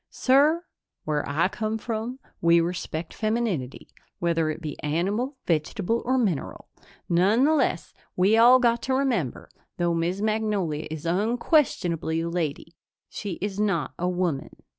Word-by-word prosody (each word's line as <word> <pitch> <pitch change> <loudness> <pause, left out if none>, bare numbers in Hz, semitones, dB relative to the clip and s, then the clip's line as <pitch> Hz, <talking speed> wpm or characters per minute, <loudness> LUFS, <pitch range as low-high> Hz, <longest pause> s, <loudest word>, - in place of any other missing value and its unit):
"Sir, 295 +6 +3 0.4
where 150 -1 0
I 155 +5 +2
come 215 +3 -3
from, 230 +2 -4 0.2
we 170 0 +5
respect 170 -1 -3
femininity, 215 - -2 0.3
whether 165 -2 0
it 155 - -4
be 155 -3 -5
animal, 200 - -1
vegetable 185 +7 0
or 260 +2 +2
mineral. 195 - -2 0.4
Nonetheless, 215 - +2 0.2
we 190 +4 +4
all 240 +3 +7
got 235 -2 +2
to 260 - 0
remember, 245 - -1 0.3
though 175 -1 +1
Miss 170 +3 -1
Magnolia 210 -8 -1
is 160 0 -6
unquestionably 180 - +1
a 165 - -2
lady, 165 -1 -3 0.4
she 200 -3 -5
is 200 0 -3
not 185 -10 0
a 180 +1 0
woman." 175 -6 -1
185 Hz, 135 wpm, -25 LUFS, 165-230 Hz, 0.4 s, all